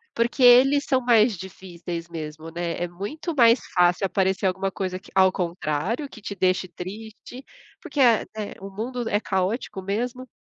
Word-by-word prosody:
porque 235 +3 -1
eles 260 +3 +7
são 260 -2 +2
mais 230 -4 +3
difíceis 175 -2 -8
mesmo, 155 -1 -7
né, 170 0 -3
é 175 - -1
muito 235 - -6
mais 235 -2 +6 0.2
fácil 180 +2 +3
aparecer 190 +1 0
alguma 190 +1 -1
coisa 185 -1 -3
que, 185 - -16
ao 190 -1 +5
contrário, 180 - -2
que - - -12
te 205 - -6
deixe 185 0 +1
triste, 215 +8 -9 0.3
porque 290 - -6
é 235 -4 +5
é 215 -2 -5
o 195 +1 -9
mundo 235 +4 -4
é 205 - +1
caótico 190 +1 -2
mesmo. 245 +6 -3
195 Hz, 165 wpm, -24 LUFS, 180-240 Hz, 0.3 s, eles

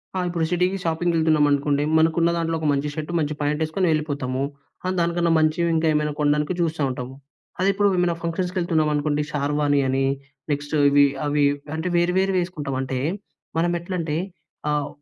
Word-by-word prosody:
ఆ! - - 0
ఇప్పుడు 170 -2 -1
సిటీకి 180 +2 +1
షాపింగ్‌కి 170 +1 0
వెళ్తున్నాం 155 -2 +3
అనుకోండి. 145 0 +1
మనకు 160 0 +3
ఉన్నదాంట్లో 165 -1 +1
ఒక 155 - -1
మంచి 140 +1 -1
షర్ట్ 155 +1 -4
మంచి 150 -1 -1
ప్యాంట్ 150 +1 -1
వేసుకొని 170 +4 0
వెళ్ళిపోతాము. 140 -4 -1 0.4
ఆ! - - 0
దానికన్నా 170 0 +1
మంచివి 155 +2 +2
ఇంకా 160 0 +2
ఏమైనా 150 0 0
కొండానికి 150 +2 +1
చూస్తా 165 -2 -1
ఉంటాము. 130 0 -6 0.4
అదే 190 +2 +3
ఇప్పుడు 205 +1 +2
ఏమైనా 175 -1 +2
ఫంక్షన్స్‌కి 180 +2 -2
వెళ్తున్నాం 160 -3 +1
అనుకోండి. 145 0 0
షార్వాని 145 0 +1
అని 135 +1 +1 0.5
నెక్స్ట్ 145 +1 -3 0.2
ఇవి 145 0 +6 0.2
అవి 145 0 +1 0.3
అంటే 160 +3 -3
వేరు 175 +1 +2
వేరు 190 0 +2
వేసుకుంటాం. 155 -6 -3
అంటే 130 -1 -3 0.6
మనం 170 +1 +2
ఎట్లంటే 170 -3 -3 0.5
ఆహ్, 150 -1 0
155 Hz, 170 wpm, -23 LUFS, 145-170 Hz, 0.6 s, ఇవి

